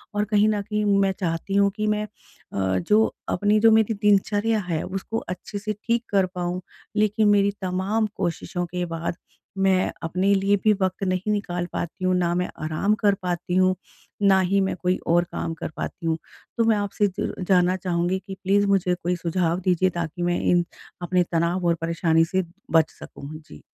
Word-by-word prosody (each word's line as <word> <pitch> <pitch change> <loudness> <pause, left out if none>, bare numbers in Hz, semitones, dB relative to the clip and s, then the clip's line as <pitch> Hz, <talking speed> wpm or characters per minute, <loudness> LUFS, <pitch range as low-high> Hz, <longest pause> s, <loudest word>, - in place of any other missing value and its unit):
और 205 - +2
कहीं 210 0 +3
न 210 -1 0
कहीं 210 +1 -2 0.2
मैं 195 -1 +3
चाहती 175 +2 -2
हूँ 200 0 +4
कि 215 0 0
मैं 210 0 +1 0.5
अ, 95 -1 0
जो 215 - +2
अपनी 205 +3 +2
जो 225 +1 +6
मेरी 220 0 +4
दिनचर्या 210 +2 +2
है 160 -2 -1
उसको 195 +4 -4
अच्छे 190 +3 -5
से 215 +1 -3
ठीक 235 0 +1
कर 195 -2 +3
पाऊँ। 180 0 -4 0.4
लेकिन, 215 0 +3
मेरी 200 0 +4
तमाम 190 +4 0
कोशिशों 175 0 -2
के 180 +1 -3
बाद 165 0 -4 0.4
मैं 190 -1 +2
अपने 185 +4 +1
लिए 195 +1 +3
भी 215 -1 +5
वक़्त 185 +1 -1
नहीं 185 +3 0
निकाल 175 -4 -2
पाती 185 +2 -4
हूँ 185 - +3
ना 175 -1 +1
मैं 180 0 -1
आराम 160 +7 +1
कर 205 -2 +2
पाती 180 0 -2
हूँ, 185 0 +4 0.5
ना 195 -1 +5
ही 195 +2 +2
मैं 190 - 0
कोई 180 0 +1
और 175 +1 +4
काम 165 - -3
कर 165 - -5
पाती 170 - -5
हूँ। 160 0 +1 0.4
तो 230 - +3
मैं 220 -2 +3
आपसे 205 0 0
ज - - -2
जानना 180 -1 +4
चाहूँगी 180 +1 -1
कि 195 - -6
प्लीज़ 200 +2 +3
मुझे 185 -2 +2
कोई 180 +1 +1
सुझाव 170 0 0
दीजिए 185 0 +2
ताकि 170 0 -4
मैं 175 0 +1
इन 175 -1 +3 0.4
अपने 180 +1 +2
तनाव 170 +2 0
और 170 - +3
परेशानी 165 -1 +2
से 190 0 +2 0.3
बच 160 -2 +4
सकूँ 140 - -10
जी। 75 - -14
185 Hz, 190 wpm, -24 LUFS, 175-205 Hz, 0.5 s, जो